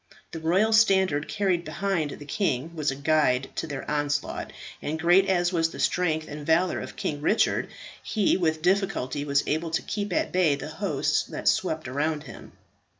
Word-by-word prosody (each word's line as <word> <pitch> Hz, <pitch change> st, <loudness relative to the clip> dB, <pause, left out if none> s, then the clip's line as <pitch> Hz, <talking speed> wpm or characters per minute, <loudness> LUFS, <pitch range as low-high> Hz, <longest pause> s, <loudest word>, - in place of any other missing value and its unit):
The 165 Hz, -, -6 dB
royal 190 Hz, +8 st, +2 dB
standard 190 Hz, -8 st, +3 dB
carried 190 Hz, -5 st, 0 dB
behind 190 Hz, -5 st, -1 dB
the 145 Hz, -, -9 dB
king 155 Hz, -, -1 dB
was 150 Hz, -2 st, 0 dB
a 135 Hz, -, -2 dB
guide 140 Hz, -3 st, +1 dB
to -, -, -2 dB
their 140 Hz, -3 st, -6 dB
onslaught, 145 Hz, -1 st, -2 dB, 0.3 s
and 155 Hz, +2 st, -3 dB
great 175 Hz, +4 st, +4 dB
as 175 Hz, -1 st, +2 dB
was 165 Hz, -1 st, +2 dB
the -, -, -10 dB
strength 160 Hz, -3 st, 0 dB
and 150 Hz, 0 st, -7 dB
valour 165 Hz, +4 st, +2 dB
of -, -, -8 dB
King 145 Hz, -1 st, -3 dB
Richard, 210 Hz, +8 st, +2 dB, 0.3 s
he 210 Hz, -4 st, +1 dB
with 160 Hz, -3 st, 0 dB
difficulty 180 Hz, -8 st, 0 dB
was 140 Hz, -1 st, +1 dB
able 160 Hz, +2 st, -1 dB
to 160 Hz, -, -1 dB
keep 205 Hz, 0 st, -3 dB
at -, -, 0 dB
bay 175 Hz, -6 st, +3 dB
the 140 Hz, -, -7 dB
hosts -, -, 0 dB
that -, -, -6 dB
swept 155 Hz, -3 st, +1 dB
around 150 Hz, +3 st, -1 dB
him. -, -, -12 dB
160 Hz, 180 wpm, -26 LUFS, 145-185 Hz, 0.3 s, great